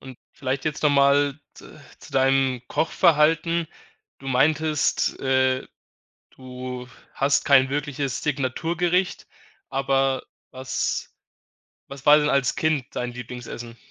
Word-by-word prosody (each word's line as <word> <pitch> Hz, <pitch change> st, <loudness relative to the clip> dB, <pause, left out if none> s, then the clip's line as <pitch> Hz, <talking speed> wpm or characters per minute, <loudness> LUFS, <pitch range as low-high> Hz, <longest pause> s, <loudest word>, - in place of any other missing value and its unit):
und 130 Hz, -2 st, -11 dB, 0.2 s
vielleicht 135 Hz, 0 st, -3 dB
jetzt 155 Hz, -1 st, -3 dB
noch 150 Hz, -, +4 dB
mal 140 Hz, 0 st, +3 dB, 0.2 s
z -, -, -14 dB, 0.3 s
zu -, -, -15 dB
deinem 135 Hz, -2 st, +2 dB
Kochverhalten. 165 Hz, 0 st, +2 dB, 0.5 s
Du 135 Hz, -, -8 dB
meintest, 150 Hz, +3 st, +1 dB
äh, 130 Hz, -1 st, +1 dB, 0.7 s
du 125 Hz, -1 st, -8 dB, 0.3 s
hast 140 Hz, +1 st, +1 dB
kein 135 Hz, -2 st, +5 dB
wirkliches 140 Hz, -2 st, -3 dB
Signaturgericht, 165 Hz, +6 st, -1 dB, 0.4 s
aber 135 Hz, 0 st, 0 dB, 0.3 s
was 130 Hz, 0 st, -3 dB, 0.8 s
was 140 Hz, +1 st, -11 dB
war 150 Hz, +1 st, +8 dB
denn 150 Hz, 0 st, +1 dB
als 135 Hz, -2 st, +1 dB
Kind 155 Hz, -5 st, 0 dB
dein 125 Hz, 0 st, -3 dB
Lieblingsessen? 120 Hz, -1 st, -8 dB
135 Hz, 110 wpm, -24 LUFS, 130-150 Hz, 0.8 s, war